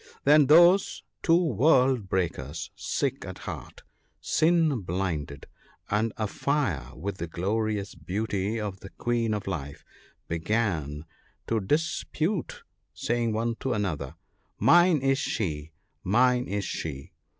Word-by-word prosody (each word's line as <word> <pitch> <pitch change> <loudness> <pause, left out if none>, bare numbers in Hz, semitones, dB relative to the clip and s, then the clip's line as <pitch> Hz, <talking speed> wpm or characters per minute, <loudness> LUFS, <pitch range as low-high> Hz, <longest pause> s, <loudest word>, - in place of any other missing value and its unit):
Then 145 0 +6
those 175 +6 +5 0.2
two 165 0 +4
world 130 - +3
breakers, 80 -5 -2
sick - - -2
at - - -7
heart, - - -8 0.4
sin 160 -4 +2
blinded, 85 -6 -3 0.5
and 110 +2 +1
afire 105 - -1
with 95 +4 -5
the 85 - -3
glorious 100 +4 -2
beauty 100 +5 -2
of 100 -3 -4
the 95 - -10
Queen 120 0 -1
of 105 - -5
Life 75 -6 -5 0.2
— - - -36
began 80 -5 -1 0.4
to 115 - 0
dispute,, 160 - -1 0.3
saying 120 -1 0
one 115 +1 -1
to 130 - -1
another: 80 - -3 0.3
' - - -45 0.2
Mine 175 -4 +5
is 135 0 +2
she! 80 - -3 0.3
mine 125 +5 +3
is 100 0 -2
she 70 -4 -5
105 Hz, 125 wpm, -27 LUFS, 85-135 Hz, 0.5 s, Then